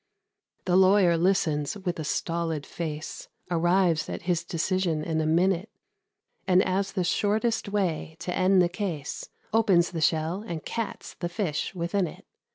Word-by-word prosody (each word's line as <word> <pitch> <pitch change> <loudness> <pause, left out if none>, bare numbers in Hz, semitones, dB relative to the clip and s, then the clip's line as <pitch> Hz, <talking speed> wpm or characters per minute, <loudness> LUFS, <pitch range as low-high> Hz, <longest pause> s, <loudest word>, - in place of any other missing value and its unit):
The 180 - +2
lawyer 190 -2 +5
listens 165 -3 +1
with 180 -4 -3
a - - -2
stolid 165 0 -2
face, 155 -2 -5 0.2
Arrives 175 -1 +2
at - - -5
his 175 -1 0
decision 170 -2 -1
in 160 0 -1
a 155 - 0
minute; 180 +5 +2 0.8
And, 185 0 +5
as 190 +1 -1
the 185 - 0
shortest 215 +4 0
way 180 -6 -1
to 180 - -3
end 185 0 +4
the - - +3
case, 175 -6 -4 0.2
Opens 195 -6 +4
the 165 -3 -3
shell 160 +4 +1
and 165 -5 -5
cats 230 -2 -4
the 175 - -2
fish 175 -2 -2
within 175 +2 0
it. - - -12
175 Hz, 155 wpm, -27 LUFS, 165-190 Hz, 0.8 s, lawyer